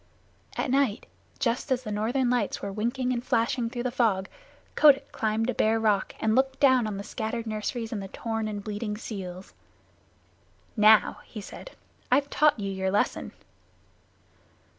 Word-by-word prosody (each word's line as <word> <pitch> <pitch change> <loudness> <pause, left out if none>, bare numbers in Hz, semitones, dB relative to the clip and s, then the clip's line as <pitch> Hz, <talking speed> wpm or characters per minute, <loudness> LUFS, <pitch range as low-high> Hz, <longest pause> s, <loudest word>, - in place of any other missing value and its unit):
At 255 - -1
night, 265 -5 +1 0.3
just 250 +3 -1
as 260 0 +1
the 215 - -5
Northern 235 +5 0
Lights 240 -4 0
were 200 - -5
winking 245 +5 -1
and 240 -1 -3
flashing 235 -1 0
through 240 0 -4
the 250 - -1
fog, 220 -7 +1 0.4
Kotick 280 -2 +5
climbed 220 -1 -1
a 250 - 0
bare 220 +1 +2
rock 210 -3 +1
and 220 - +1
looked 265 +1 +1
down 260 -5 +4
on 205 -2 -4
the 200 - -5
scattered 230 +2 -4
nurseries 220 +1 -3
and 215 -4 -3
the 195 - -6
torn 225 +2 -3
and 205 -1 -5
bleeding 210 0 -4
seals. 190 -4 -7 1.2
"Now," 215 -1 +5
he 220 - -9
said, 355 - -10 0.4
"I've 280 +2 +3
taught 300 -6 +3
you 200 -1 -3
your 190 0 -1
lesson." 205 +2 0
225 Hz, 160 wpm, -27 LUFS, 210-250 Hz, 1.2 s, Kotick